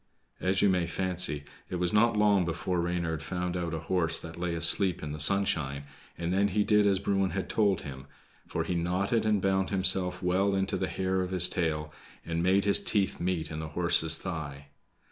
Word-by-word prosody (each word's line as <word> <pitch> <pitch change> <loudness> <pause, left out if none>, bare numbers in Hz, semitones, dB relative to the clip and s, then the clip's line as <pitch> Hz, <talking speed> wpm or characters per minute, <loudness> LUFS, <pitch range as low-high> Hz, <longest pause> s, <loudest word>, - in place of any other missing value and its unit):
As 95 +1 0
you 100 - +5
may 90 -2 +1
fancy, 90 -4 +2 0.3
it - - -4
was 90 -1 -1
not 115 +1 +3
long 105 -3 +3
before 85 +1 -2
Reynard 85 -2 -2
found 90 +2 -4
out 85 -2 -3
a 80 - -5
horse 85 -3 +1
that 85 0 -9
lay 85 -1 -2
asleep 90 +2 +2
in 75 - -5
the 75 - -6
sunshine, 75 -6 +2 0.3
and 85 +1 -3
then 100 +2 +2
he 105 +1 0
did 105 -1 +3
as 100 -1 +3
Bruin 95 0 0
had 95 +3 -4
told 100 -4 +1
him; 65 -2 -9 0.4
for - - -2
he - - -3
knotted 95 +6 -1
and 105 -3 +1
bound 95 -1 +1
himself 95 -2 +2
well 95 +2 +1
into 95 0 -1
the 95 - -2
hair 95 +2 -1
of 90 - -3
his 90 -2 +3
tail, 75 -4 -2 0.3
and 85 0 -2
made 95 +3 +2
his 100 - +3
teeth 100 -4 -1
meet 85 -3 -2
in 75 - -5
the 80 - -5
horse's 80 -2 +3
thigh. 70 -6 -6
90 Hz, 200 wpm, -28 LUFS, 85-95 Hz, 0.4 s, you